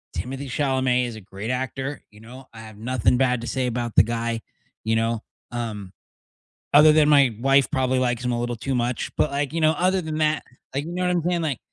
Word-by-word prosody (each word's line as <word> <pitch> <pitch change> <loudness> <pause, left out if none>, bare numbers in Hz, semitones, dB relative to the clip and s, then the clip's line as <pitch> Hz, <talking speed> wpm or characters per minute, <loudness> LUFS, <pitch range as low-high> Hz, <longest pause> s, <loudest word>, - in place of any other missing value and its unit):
Timothy 135 +10 -5
Chalamet 130 -2 +1
is 115 - -7
a 110 - -9
great 100 +4 -6
actor, 130 +2 -3
you 105 +1 -17
know, 125 +3 -12
I 110 - -10
have 110 -2 -12
nothing 125 +2 +1
bad 125 -2 +1
to 120 - -6
say 130 -1 -1
about 120 -1 -3
the - - +8
guy, 115 0 -2 0.4
you 110 0 +1
know, 115 0 0 0.3
um, 110 -5 -5 0.8
other 150 +2 +8
than 155 -1 +5
my 140 -6 +5
wife 135 +1 +3
probably 130 0 +1
likes 120 -1 0
him 125 - +1
a 120 - -1
little 120 0 -2
too 135 +4 -3
much, 120 0 -1
but, 150 - +2
like, 140 +1 -2
you 165 - -1
know, 155 0 +5
other 185 +3 +1
than 155 -2 -4
that, 155 0 +1 0.3
like 140 +2 -2
you 170 - -6
know 180 0 -2
what 180 - +2
I'm 170 - +1
saying, 175 -1 0
like, 140 -7 -2
125 Hz, 230 wpm, -23 LUFS, 115-140 Hz, 0.8 s, the